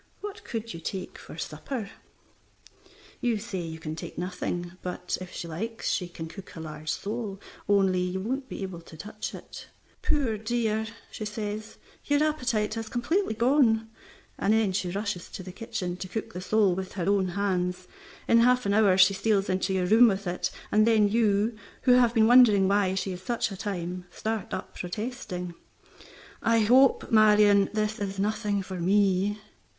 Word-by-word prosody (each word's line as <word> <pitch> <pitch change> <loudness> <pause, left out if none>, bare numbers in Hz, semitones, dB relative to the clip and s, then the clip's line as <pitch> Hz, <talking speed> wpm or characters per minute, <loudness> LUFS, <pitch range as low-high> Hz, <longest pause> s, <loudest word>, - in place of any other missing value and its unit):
What 415 0 -7
could 225 -1 -5
you 165 - -7
take 185 +2 -5
for - - -11
supper?" 195 - -5 1.3
You 240 -3 +1
say 200 -3 -5
you 165 -2 -5
can 155 -1 -5
take 160 - -8
nothing, 175 0 -3
but 180 0 -3
if 185 - -8
she 170 - -6
likes 220 +8 -3
she 180 - -1
can 170 -2 -7
cook 195 +3 -11
a - - -7
large 155 -1 -7
sole, 205 +1 -3 0.3
only 195 -2 +3
you 180 +1 -1
won't 260 +7 -3
be - - -5
able 185 -3 -6
to 165 -1 -14
touch 210 +5 -6
it. - - -10 0.3
"Poor 240 -8 0
dear!" 220 -1 0 0.2
she - - -6
says, 210 0 -5 0.3
"your 290 +1 +3
appetite 245 -9 0
has 225 -1 -5
completely 275 - 0
gone," 230 -3 +3 0.5
and 205 - +2
then 220 -3 +2
she 185 -1 -1
rushes 200 -1 -3
to 185 - -7
the 185 - -8
kitchen 200 -4 -4
to 185 - -6
cook 220 +4 -5
the 180 - -5
sole 205 0 +3
with 185 +1 -5
her 180 -3 -3
own 200 -2 +3
hands. 180 -1 -1 0.4
In 230 - +5
half 250 +1 +4
an 200 - +1
hour 205 -3 +4
she 190 +1 +7
steals 200 0 +1
into 185 +1 0
your 185 -1 +1
room 225 +6 +7
with 200 -2 0
it, 175 0 -1 0.2
and 215 +1 +4
then 215 -3 +4
you 215 0 +2 0.3
(who 250 - +4
have 245 -1 +5
been 220 -1 +5
wondering 225 -5 +7
why 195 -1 +2
she 190 0 -2
is 180 0 -6
such 230 +2 -1
a - - -5
time) 180 -2 -4
start 220 -3 -4
up - - -5
protesting, 185 -2 -5 0.9
"I 230 0 +3
hope, 255 +5 +4
Marion, 210 -2 +6
this 215 0 -1
is 195 -1 -3
nothing 205 0 0
for 185 -1 -6
me." 200 +2 +2
205 Hz, 180 wpm, -27 LUFS, 185-225 Hz, 1.3 s, she